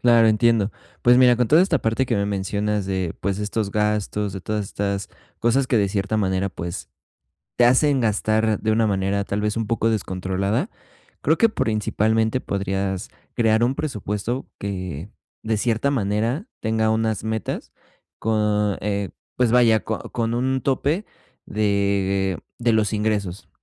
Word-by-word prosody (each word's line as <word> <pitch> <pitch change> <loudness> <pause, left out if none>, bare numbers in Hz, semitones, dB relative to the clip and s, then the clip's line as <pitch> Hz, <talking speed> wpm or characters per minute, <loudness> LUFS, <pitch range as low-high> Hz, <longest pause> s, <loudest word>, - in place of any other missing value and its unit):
Claro, 115 -2 +5
entiendo. 110 -1 +3 0.3
Pues, 120 0 +6
mira, 125 -2 +6
con 125 -2 +1
toda 160 +4 +6
esta 170 -6 +2
parte 115 +4 0
que 120 - 0
me 100 - 0
mencionas 100 +1 -1
de, 95 -3 -2
pues, 100 +1 -1
de 105 - -2
estos 105 -1 -2
gastos, 105 -1 0
de 95 - -6
todas 105 +1 -2
estas 100 0 -3 0.3
cosas 130 +3 +2
que 120 - +2
de 100 - +2
cierta 100 +2 -1
manera, 95 -1 0
pues, 85 -1 -6 0.7
te 120 - +5
hacen 135 +2 +4
gastar 110 -1 +1
de 110 - 0
una 110 0 +3
manera, 100 0 0
tal 100 +1 -2
vez, 105 +1 -1
un 115 -2 -2
poco 115 -1 +1
descontrolada. 100 - -1 0.5
Creo - - +2
que 230 -2 +4
principalmente 110 - 0
podrías 95 0 -2 0.3
crear 110 -1 +3
un 125 +3 +1
presupuesto 115 -2 -3
que 95 -3 -5 0.3
de 110 0 0
cierta 120 +5 +1
manera 115 - -1
tenga 110 0 +1
unas 110 -2 0
metas 110 0 -3 0.5
con, 105 -2 +1
eh, 100 -2 -1 0.3
pues 125 -3 +2
vaya 115 -3 +5
co 110 - -3
con 115 -1 -1
un 130 +2 0
tope 145 +8 0 0.4
de 100 -3 0 0.2
de 120 -1 +2
los 110 -1 +2
ingresos. 105 -3 -2
110 Hz, 155 wpm, -23 LUFS, 100-115 Hz, 0.7 s, Pues